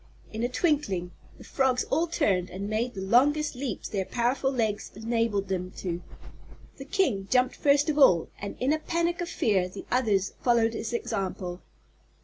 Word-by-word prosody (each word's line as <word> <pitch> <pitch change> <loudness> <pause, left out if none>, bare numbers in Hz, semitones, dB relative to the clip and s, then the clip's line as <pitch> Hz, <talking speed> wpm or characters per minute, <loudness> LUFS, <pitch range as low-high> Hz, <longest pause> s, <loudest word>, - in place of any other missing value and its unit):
In 220 - -3
a 240 - 0
twinkling 250 - 0 0.3
the - - -13
frogs 260 -2 +1
all 325 +5 +2
turned 185 - +1
and 195 +2 -5
made 225 +4 -1
the 190 - -5
longest 280 +9 +3
leaps 250 -4 -4
their 195 -2 -2
powerful 245 +6 0
legs 220 -5 -1
enabled 225 -3 0
them 185 -1 -2
to. 175 -2 -3 0.8
The 270 - -8
King 265 - 0
jumped 250 0 +3
first 285 0 +3
of 300 -1 0
all 180 - +6
and 200 - -5
in 265 +4 +2
a 310 - 0
panic 340 +2 -1
of 345 - -3
fear 190 - +1
the - - -9
others 210 -6 +1
followed 230 -2 +3
his 225 +1 -4
example. 185 -5 -3
235 Hz, 170 wpm, -27 LUFS, 195-275 Hz, 0.8 s, all